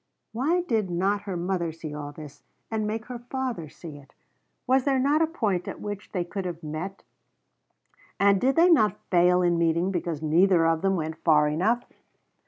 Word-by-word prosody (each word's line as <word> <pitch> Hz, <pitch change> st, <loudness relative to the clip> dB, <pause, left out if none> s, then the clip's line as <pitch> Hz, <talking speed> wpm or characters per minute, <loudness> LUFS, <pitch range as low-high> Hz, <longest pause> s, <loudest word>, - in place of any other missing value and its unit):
Why 290 Hz, +11 st, +1 dB
did 225 Hz, -, -1 dB
not 195 Hz, +4 st, 0 dB
her 185 Hz, -, -2 dB
mother 175 Hz, -1 st, -1 dB
see 160 Hz, -1 st, -8 dB
all 145 Hz, -1 st, -6 dB
this 150 Hz, -1 st, -11 dB, 0.3 s
and 215 Hz, -1 st, -1 dB
make 220 Hz, +1 st, -3 dB
her 245 Hz, -1 st, -7 dB
father 240 Hz, -, -4 dB
see 155 Hz, -2 st, -10 dB
it? 140 Hz, -1 st, -20 dB, 0.5 s
Was 260 Hz, +1 st, +3 dB
there 275 Hz, -1 st, +2 dB
not 285 Hz, +4 st, +2 dB
a 325 Hz, -, +3 dB
point 210 Hz, -, -1 dB
at -, -, -6 dB
which 205 Hz, -1 st, -6 dB
they 180 Hz, -3 st, -2 dB
could 195 Hz, +3 st, -5 dB
have 175 Hz, -2 st, -6 dB
met 160 Hz, +6 st, -6 dB, 1.2 s
and 200 Hz, -1 st, +4 dB
did 265 Hz, +2 st, +2 dB
they 345 Hz, +2 st, +5 dB
not 215 Hz, -10 st, +4 dB
fail 180 Hz, 0 st, +4 dB
in 175 Hz, -1 st, +2 dB
meeting 170 Hz, +3 st, +1 dB
because 170 Hz, -4 st, -3 dB
neither 170 Hz, +2 st, +4 dB
of 165 Hz, -1 st, +2 dB
them 195 Hz, 0 st, +1 dB
went 160 Hz, -1 st, -4 dB
far 150 Hz, -2 st, +4 dB
enough? 200 Hz, +11 st, +1 dB
185 Hz, 190 wpm, -26 LUFS, 165-225 Hz, 1.2 s, they